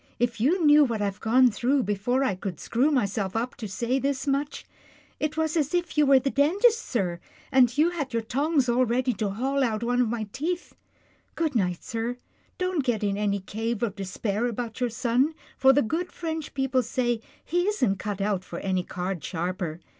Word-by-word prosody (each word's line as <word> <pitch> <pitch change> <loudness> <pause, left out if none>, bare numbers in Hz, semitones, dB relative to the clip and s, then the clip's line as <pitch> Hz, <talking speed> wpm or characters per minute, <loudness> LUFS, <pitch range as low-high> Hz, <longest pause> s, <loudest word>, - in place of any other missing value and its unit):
" - - -37
If 230 -2 -11
you 330 +7 +3
knew 295 0 +7
what 235 -5 -1
I've 200 0 -2
gone 250 +2 +4
through, 255 +6 +1
before 215 +6 0
I 235 - +1
could 185 -3 -5
screw 255 +6 +1
my 265 -8 +2
self 195 -1 -3
up 240 +2 -1
to 220 - -5
say 235 +7 -1
this 275 -1 -1
much 280 +1 -1 0.3
— - - -30
it 305 0 -2
was 315 0 0
as 305 0 +1
if 345 -2 -1
you 300 -2 +4
were 275 -1 +7
the 275 +1 0
dentist, 405 - +3
sir, 180 -8 -2 0.3
and 255 -2 +6
had 300 0 0
your 230 -1 -1
tongs 280 +3 +1
all 245 +1 +3
ready 250 +1 +1
to 215 -3 -2
haul 265 +7 0
out 225 -2 -1
one 245 +1 +2
of 240 - +1
my 220 -2 -3
teeth 345 +6 -3 0.3
— - - -37
good 320 -3 0
night, 180 -7 0
sir. 230 +2 -3 0.4
Don't 365 -6 0
get 240 -5 0
in 200 -1 +1
any 200 -1 0
cave 225 +3 -3
of 210 -4 -1
despair 200 +4 -2
about 235 -1 -4
your 245 -1 +1
son, 250 +6 +1 0.2
for 265 0 +6
the 285 +2 +3
good 325 +10 -2
French 320 -3 -5
people 265 -1 +1
say 240 -1 -1 0.2
he 350 +3 0
isn't 255 - +1
cut 205 -1 -4
out 195 -2 0
for 170 - -8
any 185 0 0
card 180 -1 -4
sharper. 175 -2 -3
245 Hz, 210 wpm, -26 LUFS, 210-285 Hz, 0.4 s, knew